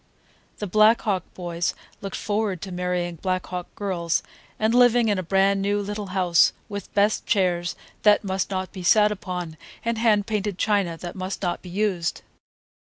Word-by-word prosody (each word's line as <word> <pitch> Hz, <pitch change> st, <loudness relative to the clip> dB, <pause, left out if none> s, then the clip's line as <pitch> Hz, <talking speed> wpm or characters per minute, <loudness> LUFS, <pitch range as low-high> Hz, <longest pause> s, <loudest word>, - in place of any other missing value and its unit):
The 210 Hz, -, -4 dB
Black 215 Hz, +4 st, +5 dB
Hawk 190 Hz, -5 st, 0 dB
boys 175 Hz, -1 st, -2 dB, 0.3 s
looked 195 Hz, -1 st, -5 dB
forward 205 Hz, -3 st, -1 dB
to 190 Hz, -, -6 dB
marrying 180 Hz, -1 st, -2 dB
Black 185 Hz, +2 st, -1 dB
Hawk 180 Hz, -1 st, -5 dB
girls, 175 Hz, -5 st, -1 dB, 0.3 s
and 220 Hz, +1 st, +1 dB
living 245 Hz, -2 st, +5 dB
in 205 Hz, -2 st, +1 dB
a -, -, 0 dB
brand 195 Hz, +2 st, +2 dB
new 205 Hz, +1 st, +1 dB
little 205 Hz, 0 st, -4 dB
house 185 Hz, -3 st, +3 dB
with 200 Hz, -1 st, -7 dB
best 205 Hz, +1 st, +2 dB
chairs 180 Hz, -4 st, +1 dB, 0.3 s
that 210 Hz, 0 st, +5 dB
must 190 Hz, -1 st, -1 dB
not 185 Hz, -2 st, -3 dB
be 185 Hz, -, -8 dB
sat 210 Hz, +4 st, +5 dB
upon, 180 Hz, -5 st, -5 dB, 0.3 s
and 230 Hz, -1 st, 0 dB
hand 215 Hz, -3 st, +3 dB
painted 210 Hz, -3 st, -2 dB
china 200 Hz, -6 st, +1 dB
that 175 Hz, +1 st, -7 dB
must 190 Hz, +1 st, -5 dB
not 175 Hz, -1 st, -1 dB
be 180 Hz, -, -10 dB
used. 180 Hz, -3 st, -1 dB
195 Hz, 175 wpm, -24 LUFS, 180-210 Hz, 0.3 s, Black